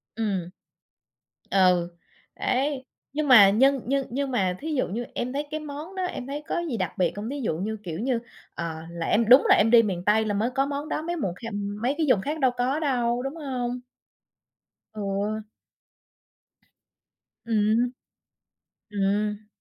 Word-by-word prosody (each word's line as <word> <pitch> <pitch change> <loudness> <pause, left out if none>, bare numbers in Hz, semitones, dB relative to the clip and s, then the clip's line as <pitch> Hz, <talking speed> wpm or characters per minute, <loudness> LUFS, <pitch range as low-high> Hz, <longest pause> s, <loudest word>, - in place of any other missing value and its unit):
Ừm. 200 -6 -2 1.0
Ừ. 180 -3 +4 0.5
Đấy. 270 0 0 0.3
Nhưng 300 0 -1
mà 220 -7 +9
nhưng 265 +6 +4
nhưng 275 +1 0
nhưng 275 +2 -2
mà 185 -7 0
thí 315 +1 -4
dụ 260 - +1
như 235 +6 -4
em 250 +1 -2
thấy 290 +1 -2
cái 310 - -2
món 305 +5 -8
đó, 375 - -2
em 360 -8 -4
thấy 290 +2 -5
có - - -1
gì 240 - -2
đặc 185 -4 -3
biệt 180 - +1
hông? 210 +3 -4
Thí 285 +1 -4
dụ 165 -10 -1
như 215 +5 -3
kiểu 170 -2 -5
như, 245 +1 0 0.4
ờ, 165 -1 -4 0.2
là 170 -1 -4
em 225 +1 +2
đúng 255 +3 +8
là - - +8
em 225 +2 +3
đi 235 -1 +8
miền 185 -5 -2
Tây 220 +1 +3
là 210 - -1
mới 215 +4 +1
có 270 0 +2
món 285 +2 -4
đó, - - -1
mấy 340 +2 -3
mùng 195 - -2
kha 230 +4 -7
ừm, 205 +1 -4
mấy 255 +4 +1
cái 320 - +1
vùng 225 -7 +4
khác 300 +8 -3
đâu 260 -3 +3
có 260 +4 +1
đâu, 245 -5 0
đúng 270 +3 -4
hông? 250 -5 -3 1.1
Ừ. 205 +1 -2 2.0
Ừm. 225 +2 +2 1.0
Ừm. 210 +1 -1
235 Hz, 180 wpm, -26 LUFS, 205-275 Hz, 2.0 s, mà